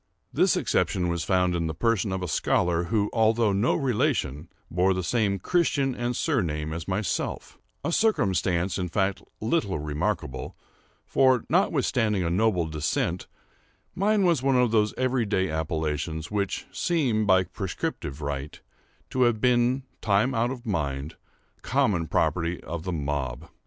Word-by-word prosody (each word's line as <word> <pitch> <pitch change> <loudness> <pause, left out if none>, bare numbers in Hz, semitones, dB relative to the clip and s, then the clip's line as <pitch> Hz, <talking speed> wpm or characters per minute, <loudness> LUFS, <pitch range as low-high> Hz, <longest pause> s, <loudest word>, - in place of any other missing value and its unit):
This - - +3
exception 90 -2 0
was 85 -1 -1
found 90 -1 +2
in 85 -1 -1
the 80 - -4
person 115 +2 +1
of 95 -1 -2
a - - -2
scholar, 85 +1 +1
who, 105 +2 +1
although 110 -2 +3
no 100 +6 +2
relation, 105 - 0 0.2
bore 90 +2 +2
the 95 - -2
same 100 0 +1
Christian 140 - +1
and 120 0 -2
surname 80 - -1
as 80 0 -5
myself;—a 100 - -4
circumstance, 95 - +1
in 90 -1 -2
fact, 95 +2 0 0.2
little 110 - 0
remarkable; 75 -3 -3 0.5
for, 130 -3 +3
notwithstanding 125 - +2
a 85 - -1
noble 95 -2 +2
descent, 80 +3 -2 0.7
mine 200 +1 +2
was 170 -7 +3
one 135 0 +2
of 125 -2 +3
those 105 -2 +3
everyday 115 -8 0
appellations 80 0 -2
which 100 -2 -2
seem, 125 -11 0
by 95 -1 +5
prescriptive 85 -6 -5
right, 70 0 -4 0.5
to 130 - 0
have 120 -3 +3
been, 125 +2 +2 0.2
time 110 +5 +2
out 120 0 +1
of 125 -1 -7
mind, 75 - -2 0.4
the - - -34
common 85 -5 +1
property 85 +1 0
of 85 +1 -6
the 90 - -2
mob. 70 -6 -3
95 Hz, 145 wpm, -26 LUFS, 85-120 Hz, 0.7 s, by